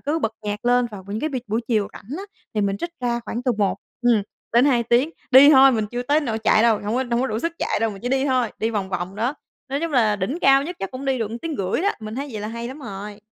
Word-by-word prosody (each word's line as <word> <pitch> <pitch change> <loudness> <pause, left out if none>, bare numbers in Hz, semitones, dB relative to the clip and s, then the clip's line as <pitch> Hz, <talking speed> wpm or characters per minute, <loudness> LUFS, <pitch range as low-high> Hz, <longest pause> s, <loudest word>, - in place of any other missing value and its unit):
cứ 300 +3 -1
bật 225 -7 -1
nhạc 210 +2 -4
lên. 245 0 +3
Vào 195 -3 -9
những 210 +2 -4
cái 310 - 0
b 280 - -8
buổi 220 +3 -1
chiều 215 -4 +1
rảnh 260 +9 -8
á, 385 - -5 0.3
thì 210 - +1
mình 200 0 0
trích 340 +10 -4
ra 240 -1 0
khoảng 240 +2 -4
từ 250 -2 +1
1 205 -2 0 0.3
ừm, 235 -4 +4 0.3
đến 240 +3 +5
2 250 -5 +3
tiếng, 240 +6 +2 0.2
đi 270 +3 +9
thôi 270 -2 +7
mình 215 -2 0
chưa 245 +3 -4
tới 290 +4 +2
nỗi 225 -6 -2
chạy 220 0 +3
đâu, 230 -2 +5
hổng 210 +3 -3
có 260 +1 +1
hổng 240 - +1
có 265 - +1
đủ 220 -2 -2
sức 335 +5 -2
chạy - - 0
đâu, 225 - +1
mình 195 0 -10
chỉ 245 - -2
đi 265 +1 +1
thôi, 255 -4 +1
đi 225 +1 0
vòng 200 -4 -2
vòng 185 0 -4
đó, 240 +6 -1 0.3
nói 275 +3 -2
chung 330 -2 -2
là 220 -5 +3
đỉnh 240 - -2
cao 275 -2 +5
nhất 350 +4 -6
chắc 195 - -4
cũng 260 +1 -7
đi 270 -1 0
được 220 -2 -2
1,5 290 - -3
tiếng - - +1
đó, 400 - +3
mình 215 0 -6
thấy 280 +3 -4
vậy 215 - -5
là 210 - -4
hay 235 +1 -5
lắm 265 +3 -8
rồi. 205 -5 -7
240 Hz, 300 wpm, -22 LUFS, 215-270 Hz, 0.3 s, đi